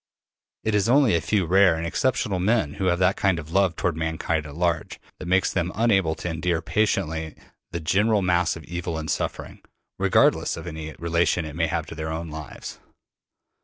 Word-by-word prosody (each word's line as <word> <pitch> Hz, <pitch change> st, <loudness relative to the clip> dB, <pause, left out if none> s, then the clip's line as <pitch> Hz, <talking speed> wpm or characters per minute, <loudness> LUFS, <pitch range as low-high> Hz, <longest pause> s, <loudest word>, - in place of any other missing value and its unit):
It 110 Hz, -, 0 dB
is 105 Hz, +2 st, +2 dB
only 135 Hz, -4 st, +5 dB
a 85 Hz, -, +2 dB
few 100 Hz, -4 st, +1 dB
rare 95 Hz, 0 st, +5 dB
and 80 Hz, +1 st, -3 dB
exceptional 105 Hz, +1 st, 0 dB
men 95 Hz, -6 st, +1 dB
who 95 Hz, -, -3 dB
have 90 Hz, -1 st, +2 dB
that 95 Hz, +1 st, +3 dB
kind 95 Hz, -3 st, +1 dB
of 80 Hz, -1 st, -7 dB
love 95 Hz, -2 st, +2 dB
toward 85 Hz, -1 st, -1 dB
mankind 80 Hz, -1 st, -2 dB
at 70 Hz, -, -10 dB
large 85 Hz, -1 st, -1 dB, 0.2 s
that 90 Hz, -, -7 dB
makes 95 Hz, +1 st, +2 dB
them 90 Hz, -2 st, -1 dB
unable 95 Hz, -7 st, +2 dB
to 85 Hz, -, -6 dB
endure 85 Hz, 0 st, -1 dB
patiently 80 Hz, -4 st, -1 dB, 0.3 s
the 85 Hz, -, -4 dB
general 105 Hz, +5 st, +2 dB
mass 90 Hz, -1 st, +2 dB
of 80 Hz, -, -9 dB
evil 85 Hz, -1 st, -4 dB
and 80 Hz, -1 st, -3 dB
suffering, -, -, -4 dB, 0.4 s
regardless -, -, +3 dB
of -, -, -8 dB
any 80 Hz, 0 st, -6 dB
relation 85 Hz, 0 st, +1 dB
it 75 Hz, -1 st, -7 dB
may 85 Hz, -1 st, +1 dB
have 85 Hz, -3 st, -2 dB
to 80 Hz, -, -9 dB
their 80 Hz, 0 st, -4 dB
own 80 Hz, 0 st, -5 dB
lives. 80 Hz, -2 st, -8 dB
85 Hz, 195 wpm, -24 LUFS, 80-95 Hz, 0.4 s, only